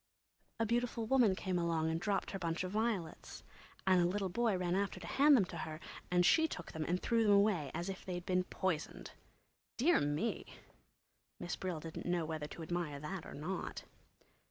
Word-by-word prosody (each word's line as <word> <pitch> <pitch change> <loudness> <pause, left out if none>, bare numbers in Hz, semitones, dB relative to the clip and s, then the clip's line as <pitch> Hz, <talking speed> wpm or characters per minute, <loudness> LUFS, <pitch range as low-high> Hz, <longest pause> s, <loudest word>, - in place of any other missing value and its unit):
A 225 - +2
beautiful 235 0 0
woman 230 -5 +4
came 185 -2 -1
along 165 -2 +1
and 165 +1 -2
dropped 200 0 0
her 195 - -4
bunch 170 0 -1
of 185 - -4
violets, 215 -6 -2 0.4
and 185 -2 +5
a - - +4
little 190 +2 0
boy 220 +1 +1
ran 180 -1 -1
after 195 0 0
to 175 - -8
hand 285 0 +6
them 200 - +3
to 170 - -8
her, 155 -1 -5 0.3
and 180 0 +3
she 320 - +5
took 180 - -7
them 160 - -3
and 180 +3 0
threw 230 +2 +2
them 210 -2 +5
away 200 -8 +3
as 175 - -3
if 195 -1 -5
they'd 180 -1 -5
been 185 0 +1
poisoned. 185 -6 -3 0.7
Dear 315 +9 +4
me! 145 +10 -2 0.8
Miss 175 - -3
Brill 180 -4 -3
didn't 165 +2 -7
know 175 -2 +1
whether 155 -1 -4
to 165 - -8
admire 160 -3 -3
that 165 +4 -5
or - - -8
not! 170 +6 -4
180 Hz, 195 wpm, -35 LUFS, 165-205 Hz, 0.8 s, hand